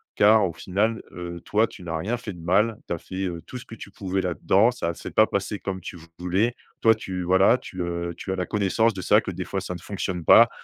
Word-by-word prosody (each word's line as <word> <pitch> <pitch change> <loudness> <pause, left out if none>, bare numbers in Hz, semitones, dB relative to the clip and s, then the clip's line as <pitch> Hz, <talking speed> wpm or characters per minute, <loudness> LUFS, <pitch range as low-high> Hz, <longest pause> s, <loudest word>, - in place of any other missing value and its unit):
car 105 0 +6
au 85 - -6
final, 105 +6 -1
heu, 85 -1 -7
toi 110 +2 +3
tu - - -13
n'as 80 -2 -3
rien 110 +9 -2
fait 115 -4 -7
de 85 - -11
mal, 105 +6 +2
tu - - -2
as - - -2
fait, 95 +3 -5
heu, 85 -2 -5
tout 125 - -7
ce 125 - -10
que 115 - -10
tu 105 - -10
pouvais 95 -1 -2
là 90 -2 -2
dedans. 100 +5 +4
Ça 85 -8 -3
s'est - - -8
pas 110 - +5
passé 100 +1 -2
comme 95 -1 -4
tu 90 - -8 0.2
voulais, 95 +7 +1 0.3
toi 115 - +6
tu 95 -4 -5
voilà, 95 +6 +5
tu, 90 - -7
heu, 85 0 -3
tu - - -5
as - - 0
la 90 - -1
connaissance 105 +3 +2
de 95 - -6
ça, 105 +4 +4
que - - -5
des 90 0 -5
fois 95 - -2
ça 90 - -5
ne - - -7
fonctionne 95 -1 -4
pas. - - +8
95 Hz, 265 wpm, -25 LUFS, 90-105 Hz, 0.3 s, pas